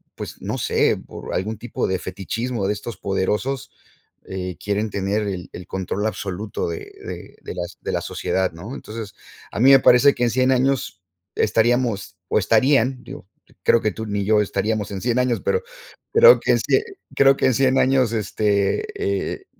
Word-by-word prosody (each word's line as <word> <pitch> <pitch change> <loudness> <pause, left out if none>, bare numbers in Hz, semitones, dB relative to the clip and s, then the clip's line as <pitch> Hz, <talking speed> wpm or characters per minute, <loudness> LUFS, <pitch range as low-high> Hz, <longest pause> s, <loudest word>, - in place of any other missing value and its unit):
pues - - -8
no - - -3
sé, - - +2
por - - -8
algún 105 +4 -2
tipo 120 +3 -3
de 95 - 0
fetichismo 100 +4 -3
de 105 - +1
estos 105 0 -7
poderosos, 105 +8 -2 0.5
eh, 90 -1 -5
quieren 105 +1 -1
tener 100 +2 -1
el 90 -3 -5
el 90 - -8
control 95 +2 -3
absoluto 100 -2 -3
de 85 - -4 0.3
de - - -8
de - - -7
las 90 0 -5
de - - -3
la - - -1
sociedad 95 -1 -1
¿no? 100 +11 -8
Entonces, 110 -2 -8 0.4
a - - -5
mí 130 +4 +7
me 135 - +8
parece 125 +3 +6
que 125 - -2
en 120 - +3
100 130 +1 +2
años 125 -9 0 0.3
estaríamos 115 -4 +1
o - - +1
estarían, 125 +4 +2
digo, - - -10 0.4
creo 115 - +4
que 110 - 0
tú 110 +4 -6
ni 100 -1 -2
yo 105 0 +4
estaríamos 105 +1 -1
en 95 - -5
100 120 0 0
años, 125 -2 +1
pero, 470 - 0 0.5
creo 480 +2 +8
que - - +1
ese - - +2 0.3
creo 135 0 +6
que - - +2
en 130 - +3
100 135 -1 +3
años, 130 -3 +3
este, 105 - 0 0.5
eh, 390 - -10
110 Hz, 180 wpm, -22 LUFS, 100-125 Hz, 0.5 s, me